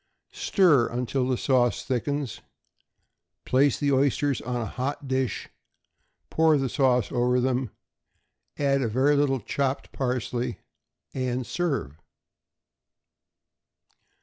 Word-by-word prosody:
Stir 155 Hz, -, +3 dB
until 125 Hz, +2 st, -1 dB
the 130 Hz, -1 st, 0 dB
sauce 120 Hz, -4 st, +1 dB
thickens; 140 Hz, 0 st, -2 dB, 1.0 s
place 135 Hz, +1 st, +3 dB
the 145 Hz, -1 st, +1 dB
oysters 140 Hz, 0 st, +1 dB
on 125 Hz, +1 st, -4 dB
a 115 Hz, -, -2 dB
hot 135 Hz, +5 st, -4 dB
dish, 130 Hz, -3 st, -1 dB, 0.8 s
pour 160 Hz, -1 st, +4 dB
the 135 Hz, -2 st, -1 dB
sauce 125 Hz, -4 st, +2 dB
over 125 Hz, 0 st, +2 dB
them, 125 Hz, -1 st, 0 dB, 0.9 s
add 140 Hz, -1 st, +2 dB
a 125 Hz, -, 0 dB
very 130 Hz, +6 st, +2 dB
little 140 Hz, -2 st, +2 dB
chopped 135 Hz, +5 st, -2 dB
parsley, 125 Hz, -2 st, -2 dB, 0.6 s
and 130 Hz, -1 st, -2 dB
serve. 120 Hz, -, -3 dB
130 Hz, 105 wpm, -26 LUFS, 125-140 Hz, 1.0 s, pour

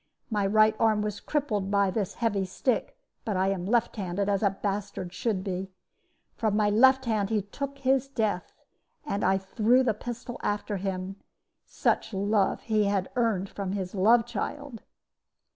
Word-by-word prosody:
My 205 Hz, -2 st, +1 dB
right 215 Hz, +1 st, +4 dB
arm 215 Hz, -2 st, +3 dB
was 210 Hz, -1 st, -3 dB
crippled 220 Hz, -10 st, -1 dB
by 200 Hz, -1 st, +2 dB
his 200 Hz, -2 st, -2 dB
heavy 215 Hz, -5 st, 0 dB
stick; 240 Hz, -, -1 dB, 0.3 s
but 210 Hz, -6 st, -2 dB
I 190 Hz, +1 st, +2 dB
am 190 Hz, -2 st, -2 dB
left 235 Hz, +1 st, +1 dB
handed, 195 Hz, +1 st, -1 dB
as 200 Hz, -1 st, +1 dB
a 205 Hz, -, +4 dB
bastard 195 Hz, -2 st, -4 dB
should 195 Hz, -1 st, -1 dB
be. 190 Hz, -1 st, -3 dB, 0.6 s
From 215 Hz, -2 st, 0 dB
my 210 Hz, -1 st, +3 dB
left 260 Hz, +4 st, +5 dB
hand 215 Hz, -4 st, 0 dB
he 215 Hz, -3 st, 0 dB
took 280 Hz, +7 st, -6 dB
his 270 Hz, 0 st, +1 dB
death, 215 Hz, -8 st, -1 dB, 0.5 s
and 205 Hz, -8 st, -2 dB
I 190 Hz, -, +3 dB
threw 220 Hz, +6 st, +2 dB
the 230 Hz, -4 st, +2 dB
pistol 240 Hz, +3 st, -7 dB
after 205 Hz, 0 st, -2 dB
him: 190 Hz, 0 st, -4 dB, 0.5 s
such 210 Hz, -, 0 dB
love 200 Hz, 0 st, +1 dB
had 205 Hz, -3 st, +1 dB
he -, -, -31 dB
earned 220 Hz, -6 st, +1 dB
from 195 Hz, -2 st, -4 dB
his 190 Hz, -2 st, -4 dB
love 225 Hz, +4 st, +4 dB
child!" 240 Hz, +2 st, -5 dB
205 Hz, 165 wpm, -28 LUFS, 195-230 Hz, 0.6 s, left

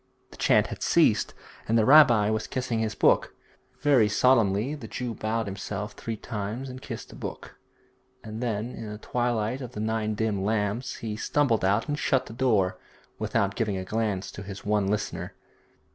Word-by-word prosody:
The -, -, -13 dB
chant -, -, +4 dB
had -, -, -7 dB
ceased, -, -, +3 dB, 0.3 s
and 115 Hz, -, +3 dB
the 110 Hz, -, +4 dB
rabbi 120 Hz, -7 st, +7 dB
was 110 Hz, 0 st, -1 dB
kissing 125 Hz, -3 st, -2 dB
his 110 Hz, -1 st, -1 dB
book. -, -, +3 dB, 0.5 s
Very 135 Hz, -7 st, +4 dB
solemnly 115 Hz, +1 st, +3 dB
the 140 Hz, -7 st, -7 dB
Jew 120 Hz, +1 st, -4 dB
bowed 110 Hz, +1 st, -2 dB
himself 100 Hz, +2 st, -5 dB
three 115 Hz, -1 st, -5 dB
times 110 Hz, +4 st, -5 dB
and 130 Hz, 0 st, -8 dB
kissed -, -, -7 dB
the -, -, -12 dB
book, -, -, -8 dB, 0.6 s
and 110 Hz, +1 st, -6 dB
then 115 Hz, -1 st, -2 dB
in 110 Hz, -, -7 dB
the 105 Hz, -, -6 dB
twilight 120 Hz, +2 st, -1 dB
of 125 Hz, -1 st, -7 dB
the 105 Hz, -, -6 dB
nine 110 Hz, 0 st, -1 dB
dim 105 Hz, -3 st, -1 dB
lamps 105 Hz, +4 st, -1 dB
he 110 Hz, -2 st, -5 dB
stumbled 120 Hz, 0 st, +1 dB
out 100 Hz, +4 st, +2 dB
and 145 Hz, 0 st, -2 dB
shut 130 Hz, -1 st, +1 dB
the -, -, -9 dB
door, 110 Hz, -7 st, +1 dB, 0.4 s
without 100 Hz, 0 st, 0 dB
giving 105 Hz, -3 st, -1 dB
a 95 Hz, -, -4 dB
glance 100 Hz, -2 st, -2 dB
to -, -, -8 dB
his 100 Hz, 0 st, -8 dB
one 105 Hz, -1 st, +1 dB
listener. 105 Hz, +1 st, -3 dB
110 Hz, 180 wpm, -27 LUFS, 105-125 Hz, 0.6 s, rabbi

